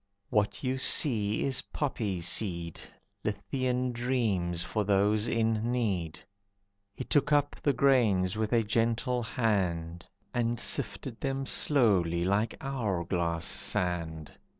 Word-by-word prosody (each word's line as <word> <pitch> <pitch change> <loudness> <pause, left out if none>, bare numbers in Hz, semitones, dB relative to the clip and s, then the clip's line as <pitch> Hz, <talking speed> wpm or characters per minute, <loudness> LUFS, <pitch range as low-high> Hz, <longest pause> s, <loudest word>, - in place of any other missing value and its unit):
"What 105 +4 0
you 130 0 -1
see 110 -7 +3
is 130 -2 0
poppy 110 - -2
seed. 85 -1 -1 0.4
Lethean 125 -1 -2
dreams 110 -9 -1
for 105 +4 -2
those 105 +2 +2
in 115 0 0
need." 95 -10 -2 0.8
He - - -5
took 145 +2 +1
up 145 -1 +2
the 145 - +2
grains 115 -9 +2
with 110 -1 -2
a 115 -2 +3
gentle 115 +3 0
hand 90 -8 -2 0.3
And 120 -1 -1
sifted 120 -4 0
them 135 0 -2
slowly 95 - +3
like 100 +5 0
hour 110 -11 -2
glass 85 -2 -1
sand. 85 -4 -1
110 Hz, 120 wpm, -29 LUFS, 90-125 Hz, 0.8 s, see